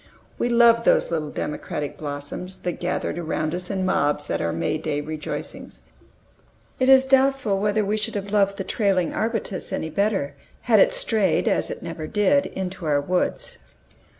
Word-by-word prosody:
We 240 - +1
loved 235 -1 +5
these - - +3
little 155 -3 -1
democratic 150 -1 -4
blossoms, 145 +5 -6
that 175 -1 -3
gathered 175 -1 -2
around 155 -1 -2
us 180 0 -3
in 190 -2 -1
mobs 150 -5 +1
at - - 0
our 85 - 0
May 85 - -1
Day 150 -2 -2
rejoicings. 155 +1 -6 1.0
It 260 0 +3
is 265 0 +7
doubtful 265 -6 +3
whether 210 +1 +1
we 210 +2 0
should 215 +1 -3
have 200 0 -4
loved 200 -1 +2
the 195 - -3
trailing 190 -3 0
arbutus 220 -4 -2
any 160 - -3
better, 195 -4 0 0.3
had - - +4
it - - +6
strayed, 225 - +1
as - - +1
it - - -6
never 155 -1 -5
did, 250 - +2
into 185 -3 -5
our 145 -1 +3
woods. 180 +6 -1
190 Hz, 170 wpm, -23 LUFS, 155-220 Hz, 1.0 s, is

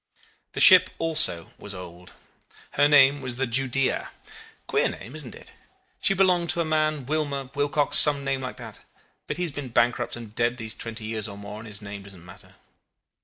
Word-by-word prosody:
"The - - -5
ship - - +8
also 155 - -1
was 100 -1 -7
old. 90 0 -11 0.6
Her 145 - +3
name 145 -1 +5
was 130 -2 -3
the 135 +2 -1
Judea. 135 +2 -1 0.6
Queer - - +1
name, 120 - -10
isn't 150 -6 -6
it? - - -15 0.5
She 195 - +2
belonged 180 -3 +2
to - - +1
a - - -1
man 155 -3 0
Wilmer, 140 -2 -3
Wilcox 145 0 +3
some 145 -2 +5
name 135 -1 -2
like 130 0 -6
that; 115 -4 -11 0.5
but - - -4
he 180 - -2
has 170 - -2
been 140 -2 -7
bankrupt 120 +1 0
and 115 -3 -10
dead 120 +2 0
these 110 -2 -5
twenty 115 -1 -7
years 110 -1 -3
or 100 -1 -9
more, 100 +1 -9
and 110 - -10
his 105 -1 -5
name 100 0 -8
don't 95 -3 -13
matter. 90 - -15
130 Hz, 190 wpm, -25 LUFS, 110-145 Hz, 0.6 s, ship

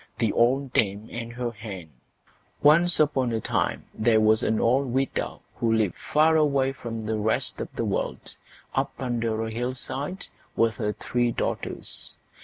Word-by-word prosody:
THE 115 -3 +1
OLD 130 +3 +2
DAME 100 +1 +1
AND 115 0 -5
HER 120 -1 -2
HEN 100 -7 -8 0.7
Once 170 +4 +5
on 140 -5 +2
a 115 - 0
time - - -1
there 110 0 +3
was 110 0 +4
an 110 - +1
old 130 +4 +3
widow 130 +2 -1
who 115 - +1
lived 110 -4 +2
far 155 +2 +3
away 140 -4 +3
from 115 -4 -6
the 110 0 -1
rest 110 +1 0
of - - -4
the - - -1
world, - - -3 0.4
up - - 0
under 115 -3 -1
a 110 - -4
hillside, 130 +8 -3 0.3
with 115 -2 +2
her 105 -2 -1
three 120 +1 0
daughters. - - -4
120 Hz, 160 wpm, -26 LUFS, 110-135 Hz, 0.7 s, Once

